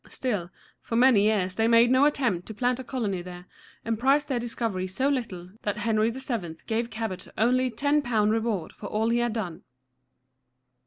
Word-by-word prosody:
Still, 205 Hz, -9 st, -2 dB, 0.3 s
for 230 Hz, -, -4 dB
many 245 Hz, -3 st, +5 dB
years 195 Hz, -4 st, +1 dB
they 225 Hz, 0 st, +3 dB
made 235 Hz, +1 st, +5 dB
no 260 Hz, +2 st, +5 dB
attempt 245 Hz, -12 st, 0 dB
to 220 Hz, -, -7 dB
plant 250 Hz, +3 st, 0 dB
a -, -, -5 dB
colony 220 Hz, -8 st, -2 dB
there, 180 Hz, 0 st, -10 dB, 0.4 s
and 225 Hz, -1 st, -1 dB
prized 280 Hz, +4 st, +2 dB
their 255 Hz, -3 st, 0 dB
discovery 230 Hz, -5 st, -2 dB
so 260 Hz, +9 st, -1 dB
little 195 Hz, -10 st, -3 dB
that 205 Hz, 0 st, -2 dB
Henry 215 Hz, +1 st, +1 dB
VII. 230 Hz, -9 st, -4 dB
gave 230 Hz, +1 st, -1 dB
Cabot 220 Hz, -5 st, -5 dB
only 255 Hz, +4 st, +3 dB
£10 240 Hz, -4 st, +1 dB
reward 220 Hz, -6 st, -1 dB
for 205 Hz, -, -8 dB
all 220 Hz, +3 st, 0 dB
he 235 Hz, +1 st, +2 dB
had 240 Hz, -2 st, 0 dB
done. 190 Hz, -8 st, -4 dB
225 Hz, 175 wpm, -26 LUFS, 205-250 Hz, 0.4 s, many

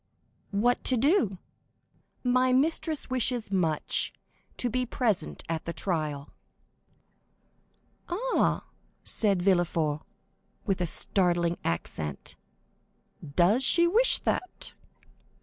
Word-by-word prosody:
"What 235 Hz, +5 st, +1 dB
to 255 Hz, -, +3 dB
do?" 245 Hz, -, +2 dB, 0.9 s
"My 255 Hz, 0 st, +3 dB
mistress 310 Hz, +2 st, +1 dB
wishes 245 Hz, -3 st, 0 dB
much 165 Hz, -6 st, 0 dB, 0.5 s
to 250 Hz, -, -1 dB
be 255 Hz, +2 st, 0 dB
present 225 Hz, -8 st, -1 dB
at 160 Hz, -1 st, -3 dB
the 170 Hz, -, -4 dB
trial." 155 Hz, -7 st, -3 dB, 1.8 s
"Ah," 465 Hz, +9 st, 0 dB, 0.4 s
said 200 Hz, -5 st, +1 dB
Villefort, 170 Hz, -5 st, +1 dB, 0.6 s
with 195 Hz, -2 st, 0 dB
a 175 Hz, -, 0 dB
startling 175 Hz, -1 st, +1 dB
accent; 75 Hz, -3 st, -3 dB, 1.0 s
"does 200 Hz, +9 st, +4 dB
she 340 Hz, +6 st, +5 dB
wish 450 Hz, +9 st, +4 dB
that?" 370 Hz, -, -3 dB
200 Hz, 95 wpm, -28 LUFS, 170-255 Hz, 1.8 s, she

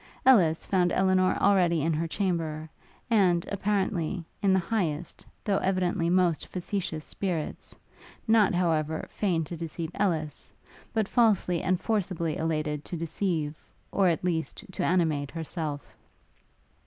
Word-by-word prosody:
Ellis 180 Hz, -12 st, +5 dB
found 180 Hz, -2 st, +2 dB
Elinor 185 Hz, -1 st, +3 dB
already 180 Hz, -6 st, +3 dB
in 165 Hz, +1 st, +1 dB
her 165 Hz, +2 st, -1 dB
chamber, 160 Hz, -3 st, -2 dB, 0.4 s
and, 180 Hz, -6 st, +3 dB
apparently, 195 Hz, -4 st, -1 dB, 0.2 s
in 200 Hz, -2 st, +3 dB
the 190 Hz, -, +5 dB
highest, 175 Hz, -4 st, -2 dB, 0.2 s
though 200 Hz, -2 st, +1 dB
evidently 185 Hz, -2 st, 0 dB
most 175 Hz, -3 st, +2 dB
factitious 180 Hz, -4 st, -4 dB
spirits: 175 Hz, -6 st, -4 dB, 0.5 s
not, 220 Hz, -4 st, +4 dB
however, 160 Hz, -3 st, 0 dB
feigned 175 Hz, -6 st, 0 dB
to 170 Hz, +3 st, -6 dB
deceive 165 Hz, 0 st, -5 dB
Ellis, 160 Hz, -7 st, -1 dB, 0.4 s
but 220 Hz, -3 st, 0 dB
falsely 210 Hz, -8 st, +2 dB
and 185 Hz, -1 st, +1 dB
forcibly 180 Hz, -7 st, -1 dB
elated 155 Hz, -2 st, -1 dB
to 175 Hz, -, -5 dB
deceive, 165 Hz, -2 st, -1 dB, 0.4 s
or, 195 Hz, -2 st, +3 dB
at 170 Hz, -1 st, +1 dB
least, 165 Hz, -3 st, -2 dB
to -, -, -3 dB
animate 160 Hz, -6 st, +1 dB
herself. 160 Hz, -3 st, -4 dB
175 Hz, 130 wpm, -28 LUFS, 160-190 Hz, 0.5 s, Ellis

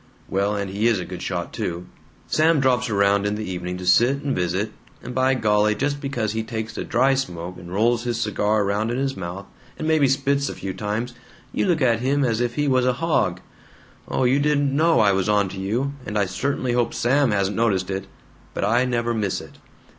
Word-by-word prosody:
("Well, 100 Hz, +2 st, 0 dB
and 100 Hz, -1 st, -3 dB
he 105 Hz, +4 st, +1 dB
is 115 Hz, -5 st, +2 dB
a 90 Hz, -, -4 dB
good 90 Hz, -, -7 dB
shot, 90 Hz, -2 st, -3 dB
too!) 85 Hz, +1 st, -4 dB, 0.4 s
Sam 160 Hz, 0 st, +3 dB
drops 125 Hz, -2 st, +2 dB
around 100 Hz, -1 st, +2 dB
in 105 Hz, -, -1 dB
the 110 Hz, 0 st, -5 dB
evening 90 Hz, 0 st, -4 dB
to 90 Hz, -, -7 dB
sit 120 Hz, +10 st, +4 dB
and 140 Hz, -2 st, -1 dB
visit, 95 Hz, +4 st, -1 dB, 0.3 s
and 125 Hz, -, -6 dB
by 130 Hz, +1 st, +2 dB
golly 105 Hz, -2 st, +2 dB
just 145 Hz, +5 st, -1 dB
because 120 Hz, -7 st, -2 dB
he 110 Hz, +1 st, -2 dB
takes 110 Hz, 0 st, -5 dB
a -, -, -3 dB
dry 130 Hz, +3 st, +2 dB
smoke 90 Hz, -9 st, -4 dB
and 90 Hz, -1 st, -10 dB
rolls 115 Hz, +4 st, +2 dB
his 120 Hz, -2 st, -2 dB
cigar 105 Hz, -1 st, +1 dB
around 100 Hz, +3 st, 0 dB
in 120 Hz, -, -1 dB
his 135 Hz, 0 st, -1 dB
mouth, 95 Hz, +2 st, -6 dB, 0.3 s
and 155 Hz, -, -3 dB
maybe 155 Hz, -3 st, +4 dB
spits 140 Hz, +1 st, +1 dB
a -, -, -6 dB
few 95 Hz, -1 st, -5 dB
times, 105 Hz, +5 st, -3 dB, 0.4 s
you -, -, 0 dB
look 165 Hz, -6 st, +2 dB
at 115 Hz, -3 st, +3 dB
him 135 Hz, +3 st, +1 dB
as 115 Hz, -1 st, 0 dB
if 120 Hz, -1 st, -1 dB
he 145 Hz, 0 st, 0 dB
was 130 Hz, -2 st, +3 dB
a 125 Hz, -, +3 dB
hog. 125 Hz, -, 0 dB, 0.7 s
Oh, -, -, 0 dB
you 130 Hz, +3 st, +3 dB
didn't 145 Hz, -1 st, +1 dB
know 165 Hz, +2 st, +4 dB
I 105 Hz, -2 st, +5 dB
was 95 Hz, +1 st, 0 dB
onto 100 Hz, -2 st, +1 dB
you, 120 Hz, +9 st, -1 dB
and 105 Hz, -3 st, -4 dB
I 100 Hz, -, +2 dB
certainly 125 Hz, +7 st, -2 dB
hope 120 Hz, -1 st, 0 dB
Sam 135 Hz, +2 st, +2 dB
hasn't 100 Hz, -1 st, 0 dB
noticed 100 Hz, -4 st, +1 dB
it, 95 Hz, 0 st, -4 dB, 0.5 s
but -, -, 0 dB
I 120 Hz, +4 st, +3 dB
never 120 Hz, -1 st, 0 dB
miss 105 Hz, -4 st, -1 dB
it." -, -, -13 dB
115 Hz, 220 wpm, -23 LUFS, 100-130 Hz, 0.7 s, I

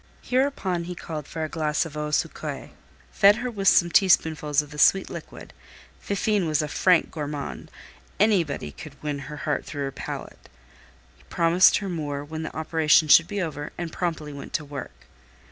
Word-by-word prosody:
Hereupon 250 Hz, -10 st, 0 dB
he 180 Hz, +1 st, -6 dB
called 155 Hz, -4 st, -7 dB
for 160 Hz, -1 st, -5 dB
a -, -, -1 dB
glass 155 Hz, 0 st, -1 dB
of 155 Hz, -2 st, -9 dB
eau 150 Hz, 0 st, -3 dB
sucrée, 150 Hz, -, -3 dB, 0.4 s
fed 200 Hz, 0 st, +6 dB
her 250 Hz, +2 st, -4 dB
with 195 Hz, -3 st, -2 dB
some 175 Hz, -2 st, +5 dB
teaspoonfuls 155 Hz, -6 st, +3 dB
of 150 Hz, -, -14 dB
the 150 Hz, -, -8 dB
sweet 195 Hz, +5 st, +4 dB
liquid -, -, -9 dB, 0.5 s
(Fifine 200 Hz, -2 st, 0 dB
was 155 Hz, -1 st, +1 dB
a -, -, -3 dB
frank 180 Hz, +3 st, +2 dB
gourmande; 145 Hz, -2 st, -5 dB, 0.5 s
anybody 175 Hz, -, +1 dB
could 150 Hz, -, -11 dB
win 145 Hz, -1 st, -3 dB
her 150 Hz, -, -7 dB
heart 150 Hz, -, -1 dB
through 145 Hz, -2 st, -5 dB
her 135 Hz, -, -3 dB
palate), -, -, -8 dB, 0.8 s
promised 170 Hz, +2 st, +4 dB
her 200 Hz, -, -4 dB
more 145 Hz, -5 st, -4 dB
when 155 Hz, +1 st, -6 dB
the 155 Hz, -, -6 dB
operation 160 Hz, -1 st, +3 dB
should 165 Hz, +2 st, +7 dB
be 205 Hz, -2 st, -2 dB
over, 150 Hz, -3 st, -5 dB
and 170 Hz, -2 st, -5 dB
promptly 160 Hz, -4 st, -3 dB
went 140 Hz, -, -9 dB
to 155 Hz, -, -1 dB
work. 95 Hz, -, -9 dB
160 Hz, 175 wpm, -25 LUFS, 150-180 Hz, 0.8 s, should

